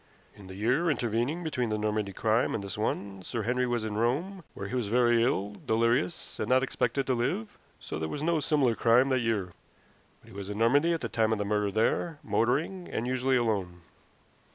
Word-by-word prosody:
In 100 -2 -14
the 95 - -9
year 125 - +1
intervening 125 +5 -1
between 130 -7 -1
the 110 - 0
Normandy 105 -1 -1
crime 110 +4 +1
and 100 - -3
this 100 -1 -5
one 100 -2 -3
Sir 110 +5 -4
Henry 125 +3 0
was 120 -2 -1
in 105 -1 -3
Rome, 165 - -1
where 100 - -5
he 115 - -8
was 125 -4 -1
very 120 +1 +3
ill, 105 -4 0
delirious, 115 +9 0
and - - -2
not 130 +1 +4
expected 135 +1 -1
to 130 - +1
live, 120 -2 -2 0.2
so - - -6
there 80 0 -3
was 145 - -4
no 165 0 +2
similar 145 -5 +2
crime 120 +4 +4
that 130 -1 +2
year. 110 -6 -1 0.7
But - - -18
he - - -14
was 100 0 -6
in 105 - -4
Normandy 140 +9 +3
at 165 - -2
the - - -2
time 110 -1 +1
of 110 - +1
the 105 - -2
murder 105 0 +1
there, 115 - 0
motoring, 135 - 0
and 115 - -2
usually 130 +1 +1
alone." 95 -7 -1
115 Hz, 210 wpm, -29 LUFS, 105-130 Hz, 0.7 s, not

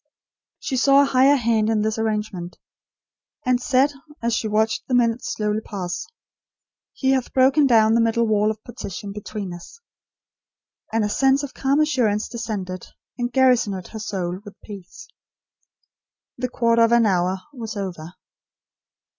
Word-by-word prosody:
She 260 - -3
saw 275 +3 +5
a - - +2
Higher 270 +1 +4
Hand 225 -4 +1
in 215 -2 +1
this 220 +1 -1
arrangement; 210 -5 -3 0.9
and 250 -1 +2
said, 265 +3 +3 0.3
as 235 0 -1
she 225 - -1
watched 220 +1 0
the 255 - +1
minutes 235 0 +1
slowly 210 0 -1
pass: 185 -4 -5 0.9
"He 265 -1 0
hath 260 -2 0
broken 270 +2 +4
down 220 -3 +5
the 230 - +4
middle 230 0 +2
wall 215 -1 +2
of 220 0 -5
partition 200 -4 -7
between 205 -2 -6
us"; 175 - -12 1.1
and 225 -1 +1
a - - 0
sense 270 +5 +2
of 280 - -6
calm 275 +2 +1
assurance 245 -9 +1
descended, 210 -6 -5 0.3
and 245 0 -1
garrisoned 245 -8 +2
her 220 - -8
soul 185 -4 -3
with 205 -2 -13
peace. 200 - -11 1.3
The 250 0 -3
quarter 230 -1 +2
of 230 0 +4
an 235 -1 +5
hour 185 -1 +1 0.2
was 225 -5 -6
over. 175 -3 -6
225 Hz, 150 wpm, -22 LUFS, 205-250 Hz, 1.3 s, saw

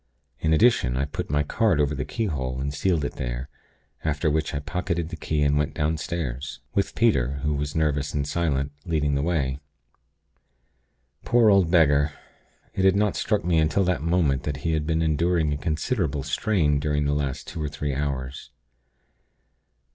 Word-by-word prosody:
In 80 - 0
addition, 80 - +3
I 70 - +1
put 70 - -5
my 75 0 +2
card 95 +2 +1
over 75 0 +2
the 70 0 -3
keyhole, 70 - -2
and 70 +1 -2
sealed 80 0 0
it - - -5
there; - - -4 0.5
after 75 0 0
which 80 0 -1
I - - -1
pocketed 85 +2 -2
the - - -5
key, 75 -2 -1
and 75 0 +3
went 75 - -1
downstairs 75 -4 -2
with 100 - 0
Peter; 70 - +2
who 75 0 +1
was 70 0 -3
nervous 75 -2 0
and 75 -2 -1
silent, 75 -3 0
leading 75 -4 0
the 70 - +1
way. 70 -5 0 1.6
Poor 115 -3 +4
old 95 -4 +4
beggar! 75 -3 +4 0.6
It 95 - -1
had 95 0 +5
not 105 0 +1
struck 105 -5 0
me 85 -2 +3
until 80 +5 +2
that 90 -3 0
moment 80 -5 +1
that 70 0 -3
he 80 - +2
had 75 -1 -1
been 80 0 +1
enduring 80 0 +1
a - - -2
considerable 80 - -1
strain 75 0 +1
during 75 0 0
the 70 - +1
last 70 -3 -2
two 80 - -6
or 75 - -2
three 75 -1 -3
hours. 65 -2 -4
75 Hz, 175 wpm, -25 LUFS, 70-85 Hz, 1.6 s, had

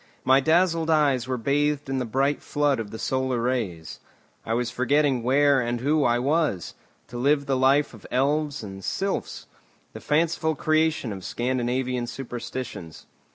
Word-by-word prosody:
My 130 +1 +5
dazzled 165 +2 +2
eyes 140 -6 +2
were 130 -1 -1
bathed 145 +4 0
in 135 0 -1
the 125 - -2
bright 135 +5 0
flood 145 -3 0
of 110 -2 -5
the 110 - -7
solar 130 0 -1
rays. 115 -10 -3 0.4
I 115 - -1
was 120 0 -1
forgetting 130 +1 +1
where 135 +2 +3
and 120 0 -2
who 145 +4 +1
I 120 0 +3
was, 140 - 0 0.4
to 120 - -7
live 140 +2 +2
the 135 -1 0
life 135 +2 +3
of 115 - -13
elves 145 +1 0
and 95 -2 -8
sylphs, 195 - -3 0.5
the - - -9
fanciful 160 +1 +1
creation 155 -6 +1
of 95 -1 -9
Scandinavian 125 +2 -1
superstitions. 120 - -7
130 Hz, 155 wpm, -25 LUFS, 120-145 Hz, 0.5 s, My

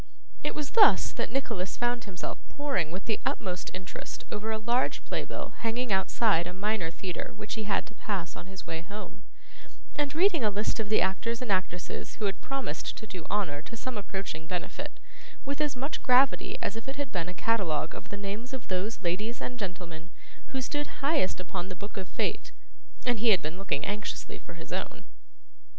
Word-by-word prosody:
It - - 0
was 300 -2 -2
thus 445 -3 +8
that - - -2
Nicholas 225 -9 0
found 240 -1 +1
himself 190 -4 -4
poring 275 - +1
with 185 +4 -4
the 220 - +1
utmost 180 -5 -1
interest 185 -1 -6
over 215 +1 -1
a 220 - +1
large 235 +4 +2
play - - -1
bill - - -4
hanging 230 0 +1
outside 190 -2 +4
a 180 - -4
Minor 200 -2 +1
Theatre 180 +1 -4
which 210 - -4
he 220 -1 -2
had 205 -1 +2
to 250 - -12
pass 195 -6 -2
on 175 - -7
his 190 0 -7
way 160 0 -2
home, 195 +1 -7 0.7
and 290 -1 +1
reading 345 - +5
a 215 - +5
list 210 +3 0
of 215 -2 0
the 215 - +5
actors 230 +5 +1
and 250 -5 -1
actresses 185 -2 0
who 215 - -1
had 195 -1 0
promised 275 -1 -2
to 220 - -5
do 185 -5 -7
honour 185 -8 +1
to 230 +9 -8
some 255 +2 -3
approaching 195 -6 -3
benefit, 180 +1 -3 0.5
with 280 +2 0
as 295 -3 +2
much 275 +5 -2
gravity 255 +1 +5
as - - 0
if 225 - -6
it 270 - -2
had 285 -3 -2
been 175 -2 0
a - - -4
catalogue 175 -7 +2
of - - -8
the 205 - -4
names 205 +6 -4
of 260 -3 -5
those 190 +4 -1
ladies 210 +7 0
and 250 -1 -4
gentlemen 175 -4 -5 0.4
who 265 0 -1
stood 290 +3 0 0.2
highest 285 - +3
upon 185 0 -3
the 185 - -4
Book 205 +3 -7
of 190 -3 -3
Fate, - - -1 0.5
and 245 -3 +3
he 230 +1 +5
had 195 -4 +8
been 155 +5 -3
looking 170 -7 0
anxiously 205 +1 -3
for - - -10
his - - -7
own. - - -2
210 Hz, 200 wpm, -31 LUFS, 185-245 Hz, 0.7 s, thus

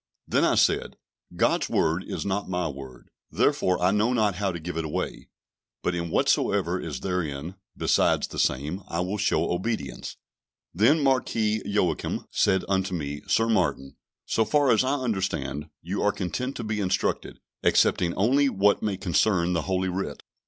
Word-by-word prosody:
Then - - +2
I - - +3
said, - - +2 0.4
"God's - - +1
Word 85 +4 +1
is - - -5
not 100 0 -2
my 90 -2 -1
word, 65 -4 -9 0.2
therefore 90 -1 +1
I 90 +1 +3
know 105 +4 +2
not 110 -4 +2
how 100 -1 0
to 85 - -5
give 90 +2 -6
it 80 - -1
away; 75 - -4 0.5
but 90 - 0
in 85 -1 -3
whatsoever - - +1
is - - -5
therein, 85 -3 -3 0.2
besides - - +2
the - - -6
same, 75 +9 0
I 85 - -2
will 95 +4 -2
show - - +1
obedience." 110 +6 -3 0.6
Then 130 - +4
Marquis 110 -5 +1
Joachim 100 -3 -1
said 95 -2 +2
unto 95 -1 0
me 75 -2 -4
"Sir 115 - +2
Martin, 90 -11 0 0.3
so 110 - +1
far 140 +4 +3
as 115 - +4
I 135 +2 +1
understand, 95 - -2
you 95 +4 -3
are 105 - +3
content 125 +9 -3
to 120 - -5
be 105 -1 -2
instructed, 95 -2 -1 0.2
excepting 85 -2 +3
only 135 +8 +3
what 100 -2 +2
may 105 -3 -1
concern 90 -1 +1
the 85 - +1
Holy 95 0 +1
Writ." 90 -6 -4
95 Hz, 165 wpm, -26 LUFS, 85-110 Hz, 0.6 s, Then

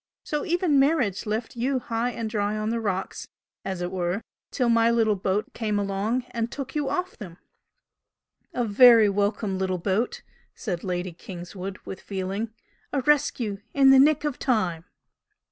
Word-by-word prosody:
So 300 -2 -2
even 340 -4 +2
marriage 270 - +1
left 220 +3 -3
you 260 +3 0
high 235 -1 -1
and 230 -2 -4
dry 210 -1 -1
on 215 +1 -1
the 230 - -1
rocks 195 -4 -3 0.4
as 185 -2 -3
it 175 - -3
were 180 +2 -2 0.3
till 250 - 0
my 230 0 +4
little 225 -2 +3
boat 195 +2 -2
came 215 -3 -1
along 205 +5 -1
and 230 0 -2
took 275 -2 -6
you 295 -2 -1
off 365 +1 -2
them!" 175 -5 -10 1.1
"A 245 - -1
very 225 0 +7
welcome 200 -1 -1
little 185 -1 0
boat!" 195 +6 -1 0.3
said 180 -8 -4
Lady 180 -1 -2
Kingswood, 185 +2 -8
with 190 - -7
feeling 195 +3 -4 0.4
"A 275 - 0
rescue 245 -7 +1 0.2
in 270 -1 +7
the 270 - +7
nick 295 +2 +4
of 295 -3 -2
time!" 185 - 0
215 Hz, 160 wpm, -25 LUFS, 190-250 Hz, 1.1 s, very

